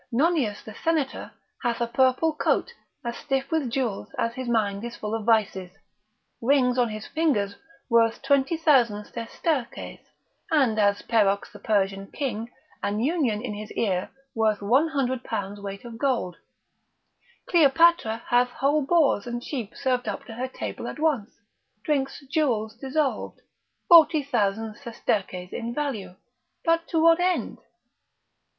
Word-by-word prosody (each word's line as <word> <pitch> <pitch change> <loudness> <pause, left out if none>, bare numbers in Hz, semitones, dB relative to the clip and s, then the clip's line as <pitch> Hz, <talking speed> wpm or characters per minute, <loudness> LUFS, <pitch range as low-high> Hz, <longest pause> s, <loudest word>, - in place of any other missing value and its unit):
Nonius 265 - +1
the 220 - -9
senator 315 -5 -1 0.3
hath 235 -1 -1
a 235 - +1
purple 260 +6 +2
coat 305 +10 0 0.3
as 235 0 -3
stiff 270 0 -2
with 315 -6 0
jewels 235 -5 -2
as 230 - 0
his 255 0 -5
mind 205 -3 0
is 235 0 -5
full 210 0 -5
of 225 -2 -3
vices; 205 -5 +2 0.7
rings 250 0 +3
on 240 -2 +3
his 215 0 -6
fingers 240 -12 0 0.3
worth 230 -1 +3
20,000 270 -6 +3
sesterces, 235 +4 -3 0.5
and 265 -9 +2
asPerox 205 0 +2
the 205 - -12
Persian 195 -2 0
king, 235 -5 -3 0.3
an 205 +1 -1
union 250 -5 0
in 240 -4 -3
his 210 +1 -7
ear 185 -5 -1 0.2
worth 220 -2 +1
one 260 +10 +4
hundred 260 -5 -1
pounds 205 -2 -4
weight 200 +2 -7
of 230 -1 -9
gold:Cleopatra 280 - 0
hath 245 +1 +4
whole 280 +4 +1
boars 280 -8 +2
and 240 0 -4
sheep 240 -7 -5
served 255 -2 0
up - - -4
to 225 - -9
her 250 +3 -3
table 260 - -6
at - - -6
once, 295 -9 -1 0.4
drinks 275 -2 -1
jewels 245 -7 0
dissolved, 270 +3 -2 0.5
40,000 255 - +4
sesterces 195 -7 -3
in 235 +1 -4
value; 220 -12 -3 0.5
but 330 0 +2
to 330 - 0
what 330 +1 +5
end? 360 0 0
240 Hz, 135 wpm, -25 LUFS, 215-285 Hz, 0.7 s, what